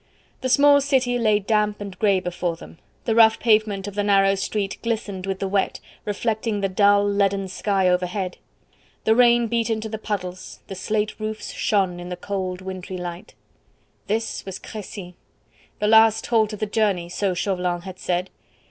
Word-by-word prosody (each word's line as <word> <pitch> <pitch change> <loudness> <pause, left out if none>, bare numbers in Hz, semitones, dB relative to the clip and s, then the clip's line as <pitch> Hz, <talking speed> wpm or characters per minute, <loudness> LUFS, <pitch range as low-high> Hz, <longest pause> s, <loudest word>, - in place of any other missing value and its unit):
The 260 - -1
small 285 +2 +6
city 260 -3 +1
lay 215 -3 +3
damp 210 0 0
and 200 -3 -8
grey 200 -3 +3
before 175 -1 -3
them; 165 - -13 0.3
the 225 - +1
rough 220 -1 +6
pavement 215 -3 +2
of 205 - -6
the 205 - -1
narrow 195 -1 +4
street 195 +1 -2
glistened 205 -5 -3
with 195 -1 -2
the 195 - -2
wet, 195 0 0 0.3
reflecting 215 +1 -1
the 195 -1 0
dull, 200 +1 +4
leaden 200 -1 +1
sky 190 0 0
overhead; 180 +1 -1 0.7
the 220 - +4
rain 240 0 +5
beat 230 0 0
into 220 0 -2
the 220 0 -5
puddles; 185 -4 -5
the - - -7
slate 210 +3 -2
roofs 215 0 -4
shone 190 -4 0
in 175 0 -7
the 180 - -5
cold 185 -1 -4
wintry 185 0 -6
light. 175 0 -7 0.7
This 225 +2 -2
was 190 -1 -6
Crecy! 200 -4 -8 0.6
The 210 - 0
last 220 0 +5
halt 220 -2 +2
of - - -5
the 215 - 0
journey, 205 -5 0
so 185 +1 -1
Chauvelin 180 -1 -1
had 185 0 -9
said. 180 +1 -2
200 Hz, 175 wpm, -23 LUFS, 185-220 Hz, 0.7 s, small